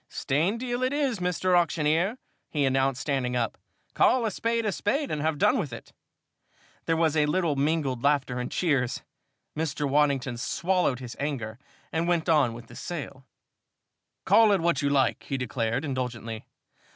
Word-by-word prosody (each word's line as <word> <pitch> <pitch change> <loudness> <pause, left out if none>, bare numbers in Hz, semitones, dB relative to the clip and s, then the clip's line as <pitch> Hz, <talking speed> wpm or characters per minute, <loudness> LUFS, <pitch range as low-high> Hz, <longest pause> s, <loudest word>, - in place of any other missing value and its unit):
"Stained 170 +11 0
deal 245 0 -3
it 255 +2 +1
is, 275 -7 0
Mr. 180 +1 +1
Auctioneer," 170 +5 +2 0.3
he 145 -3 0
announced, 135 0 +1
standing 130 -4 -1
up. 120 -2 -1 0.4
"Call 250 -2 +3
a 220 - 0
spade 230 +3 -1
a 210 - +1
spade 275 +10 -1
and 150 - -2
have 155 0 0
done 255 - +3
with 155 -10 -3
it!" 115 - -10 0.9
There 165 - +1
was 160 -2 +2
a 150 -1 +3
little 165 -1 +1
mingled 140 -3 0
laughter 140 -3 +1
and 125 - -3
cheers. 140 -8 0 0.5
Mr. 150 -2 -1
Waddington 140 -3 +1
swallowed 175 +2 0
his 120 -2 -7
anger 125 -6 -3 0.3
and 165 +1 0
went 175 -2 +1
on 145 -8 +3
with 115 0 -10
the 120 - -14
sale. 140 -6 -7 1.0
"Call 225 -2 +6
it 200 - +3
what 170 -4 +1
you 140 - +1
like," 135 -2 +2
he 135 - -2
declared, 125 +1 -2
indulgently. 120 -5 -4
150 Hz, 165 wpm, -27 LUFS, 130-175 Hz, 1.0 s, Call